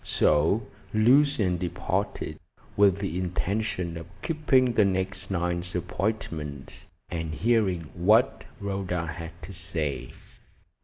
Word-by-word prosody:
So 80 +9 +3 0.3
Lucian 110 - +4
departed, 90 -1 -2 0.4
with 100 -2 +5
the 95 -3 -2
intention 90 -1 -1
of 85 - -8 0.2
keeping 135 -6 +3
the 110 - +5
next 95 0 -1
night's 90 -1 -1
appointment, 85 -6 -3 0.2
and 80 -2 -3
hearing 105 -6 +2
what 105 +8 +3
Rhoda 95 -4 -2
had 85 +1 -7
to 95 +4 -7
say. 80 -7 -3
90 Hz, 105 wpm, -27 LUFS, 85-105 Hz, 0.4 s, with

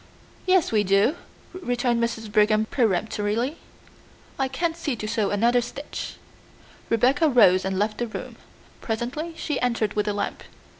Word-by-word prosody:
"Yes, 370 -3 +3
we 215 -2 +3
do," 200 - +3 0.4
returned 245 -8 0
Mrs. 225 -2 -3
Brigham 215 0 +3
peremptorily. 220 - 0 0.8
"I 270 - +2
can't 325 +6 -1
see 305 -6 -2
to 215 - -6
sew 215 -2 0
another 235 +4 +3
stitch." 275 +5 -6 0.7
Rebecca 260 +7 +3
rose 190 -8 +5
and 190 0 -2
left 210 +2 -1
the 240 - -1
room. 220 - -7 0.4
Presently 250 +9 -3
she 295 -4 -2
entered 230 -4 0
with 210 0 -1
a 210 - +1
lamp. 205 0 -3
230 Hz, 145 wpm, -24 LUFS, 210-265 Hz, 0.8 s, rose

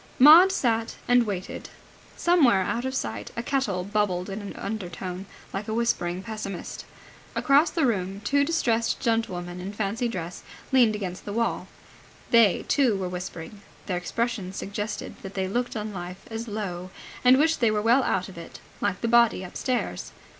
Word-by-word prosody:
Maud 325 +8 +9
sat 230 -10 0
and 245 -2 +4
waited. 190 -3 -5 0.5
Somewhere 275 - +4
out 235 +6 -2
of 260 0 -2
sight 110 - -3
a 235 - -2
kettle 235 -10 0
bubbled 200 -2 -1
in 200 +2 -5
an 200 - -7
undertone, 185 -2 -5 0.3
like 200 +2 -4
a 220 - -2
whispering 185 -6 0
pessimist. 215 -4 -6 0.5
Across 290 +3 +4
the 325 -5 +1
room 195 -4 -1
two 280 +7 +2
distressed 235 -8 +1
gentlewomen 180 -7 -1
in 190 +2 -5
fancy 215 +4 -1
dress 180 -6 -5 0.3
leaned 240 -5 +5
against 185 -3 -5
the 205 - -4
wall. 230 +1 -1 0.6
They, 230 -6 +5
too, 255 -8 +3
were 185 -2 -3
whispering. 180 +1 -7 0.2
Their 185 -3 -1
expressions 195 +1 -2
suggested 205 +1 -5
that 195 0 -9
they 190 -1 -1
looked 245 +6 -2
on 210 -1 -4
life 180 0 -7
as 225 +1 -4
low 185 -4 -4 0.3
and 250 +1 +7
wished 320 +3 +3
they 230 - +4
were 215 -1 +1
well 240 +4 +5
out 190 -7 0
of 180 -3 -10
it, 170 - -10 0.2
like 200 -2 -1
the 230 - 0
body 235 -4 +4
upstairs. 245 +7 -3
210 Hz, 170 wpm, -26 LUFS, 185-235 Hz, 0.6 s, Maud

